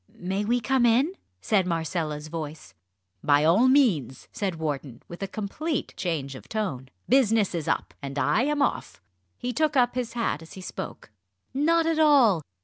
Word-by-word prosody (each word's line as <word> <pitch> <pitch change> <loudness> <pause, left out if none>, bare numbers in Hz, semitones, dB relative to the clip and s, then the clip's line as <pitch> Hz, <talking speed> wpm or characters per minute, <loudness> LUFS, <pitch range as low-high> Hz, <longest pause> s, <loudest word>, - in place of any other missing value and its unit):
"May 190 +3 -2
we 240 +3 +2
come 245 +2 +3
in?" 260 +10 +3 0.3
said 195 -4 +2
Marcella's 160 -2 -2
voice. 155 -1 -7 0.5
"By 145 0 +4
all 190 +11 +5
means," 195 - +2
said 195 -4 -2
Wharton, 145 -6 -4
with 170 - -10
a 195 - -2
complete 220 - -3
change 150 -6 -3
of 130 - -12
tone. 155 - -3 0.2
"Business 225 -6 +3
is 165 -3 -3
up - - -1
and 140 0 -6
I 180 +9 +2
am 290 +2 +1
off!" - - -2 0.4
He 250 0 -3
took 305 +1 +1
up 245 -1 +3
his 250 -2 -3
hat 230 -10 -1
as 160 - -12
he 190 - -9
spoke. 170 - -7 0.4
"Not 325 +4 +2
at 325 -1 +1
all! 270 - +5
200 Hz, 170 wpm, -26 LUFS, 155-255 Hz, 0.5 s, all